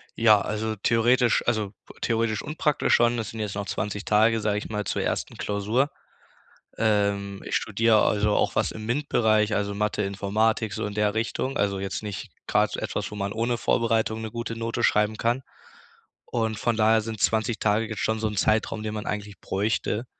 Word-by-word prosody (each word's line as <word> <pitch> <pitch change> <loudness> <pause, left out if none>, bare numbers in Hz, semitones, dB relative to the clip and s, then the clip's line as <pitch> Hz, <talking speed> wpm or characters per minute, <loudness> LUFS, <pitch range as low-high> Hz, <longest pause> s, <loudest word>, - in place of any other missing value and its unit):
Ja, 110 -3 +5
also 110 +1 -2
theoretisch, 120 +3 +3
also 110 -4 0 0.3
theoretisch 115 -2 0
und 150 +2 -7
praktisch 150 -7 +2
schon. 120 0 +3
Das 110 -3 -3
sind 115 - -8
jetzt 105 -2 -3
noch 100 -1 -4
20 105 +2 -3
Tage, 110 +2 +4
sage 105 -1 0
ich 105 - -5
mal, 105 -1 -2
zur - - -1
ersten - - -2
Klausur. 105 +7 0 0.9
Ähm, 100 -2 0
ich - - -1
studier 110 +1 +2
also 105 0 +3
auch - - +1
was - - +2
im 110 0 -7
MINT-Bereich, 110 -5 +2
also 100 0 -1
Mathe-Informatik, 105 +1 0
so 95 - -3
in 105 - -5
der 105 0 +1
Richtung. 130 +4 -2
Also 100 -1 0
jetzt 95 +2 -4
nicht 105 -4 -6 0.2
grad - - +2
so - - -3
etwas, - - -3
wo 105 - -8
man 100 0 -2
ohne 115 +2 -1
Vorbereitung 110 -1 +1
'ne 110 - -5
gute 115 -1 -5
Note 115 +1 -2
schreiben 105 +1 +3
kann. 120 +4 0 0.8
Und 110 -2 -1
von 120 -2 0
daher 110 0 +4
sind 110 -1 -6
20 110 +1 +1
Tage 110 +1 +2
jetzt 110 - -5
schon 110 0 0
so 110 - 0
'n 105 - -6
Zeitraum, 110 +1 +1
den 110 0 -4
man 105 -1 -4
eigentlich 105 -1 -5
bräuchte, 105 +3 -1
110 Hz, 190 wpm, -25 LUFS, 105-115 Hz, 0.9 s, Ja